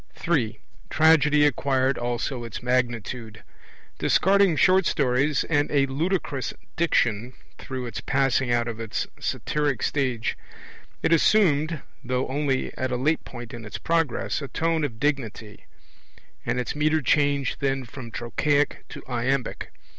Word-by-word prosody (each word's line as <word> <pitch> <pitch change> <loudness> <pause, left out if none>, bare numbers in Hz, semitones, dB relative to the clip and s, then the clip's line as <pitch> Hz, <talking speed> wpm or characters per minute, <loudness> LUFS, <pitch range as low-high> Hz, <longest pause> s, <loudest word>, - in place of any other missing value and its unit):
(3) 135 - 0 0.3
Tragedy 150 -2 +5
acquired 135 -2 +1
also 120 +1 -2
its 115 0 -7
magnitude. 120 -2 -2 0.6
Discarding 195 -2 +4
short 185 +3 +4
stories 135 +2 +1
and 145 -2 +1
a 140 -2 +3
ludicrous 145 -1 -2 0.2
diction, 125 -7 +1 0.3
through 130 -1 -5
its 120 - -5
passing 135 -2 +1
out 120 0 +1
of 115 -1 -5
its 115 -2 -2
satyric 145 -3 -1
stage, 130 -6 0 0.7
it 170 - +3
assumed, 160 -4 +3 0.2
though 125 0 -1
only 135 -1 -1
at 130 0 -2
a 125 - 0
late 150 +5 +1
point 120 -1 -9
in 120 -1 -7
its 105 - -6
progress, 165 -4 0
a 140 - -5
tone 165 +2 0
of 120 -6 -3
dignity; 120 -7 -2 0.8
and 125 - 0
its 125 - -3
metre 155 0 +2
changed 140 -2 +2
then 135 -2 -1
from 120 0 -9
trochaic 145 +6 0
to - - -9
iambic. 125 +1 -2
135 Hz, 135 wpm, -25 LUFS, 120-150 Hz, 0.8 s, Tragedy